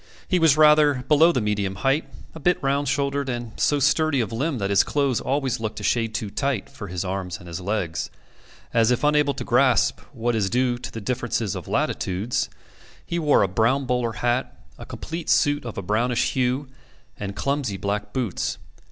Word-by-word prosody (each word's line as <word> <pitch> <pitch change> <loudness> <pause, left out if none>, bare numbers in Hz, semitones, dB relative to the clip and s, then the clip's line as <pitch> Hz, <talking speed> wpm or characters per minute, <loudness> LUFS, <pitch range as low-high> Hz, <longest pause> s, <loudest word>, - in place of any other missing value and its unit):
He 180 - +2
was 160 -3 +5
rather 150 -4 +5
below 160 +3 +6
the 125 - 0
medium 105 -2 -1
height, 135 +8 0 0.2
a 160 - -9
bit 175 +4 +2
round 140 +1 +1
shouldered, 140 0 0
and 120 -2 -4
so 145 - +3
sturdy 145 +1 +2
of 115 -2 -1
limb 140 +5 -1
that 100 -2 -2
his 100 - +5
clothes 140 -5 0
always 135 -3 -1
looked 110 -1 -4
a - - -8
shade 115 -2 0
too 110 -5 -3
tight 135 -5 -2
for 105 - -8
his 90 +1 -4
arms 90 -2 -3
and 85 -2 -7
legs. 95 -4 -2 0.6
As 115 0 +4
if 125 +3 +1
unable 150 -1 +3
to - - -4
grasp 125 0 +3
what 120 -3 -1
is 100 -3 +1
due 125 +1 +1
to 130 - -7
the 115 - -6
difference 120 +2 -2
of - - -7
latitudes, 95 +6 -1 0.6
he 170 - -2
wore 150 -8 +4
a - - +2
brown 115 +8 +1
bowler 125 -2 0
hat, 120 +3 -1 0.2
a - - -9
complete 165 0 -6
suit 145 -1 +3
of 120 - -6
a 100 - -3
brownish 115 +5 +1
hue, 130 +2 0 0.5
and 100 -1 -5
clumsy 135 -3 -1
black 105 +1 -3
boots. 120 -6 -2
125 Hz, 190 wpm, -24 LUFS, 105-140 Hz, 0.6 s, below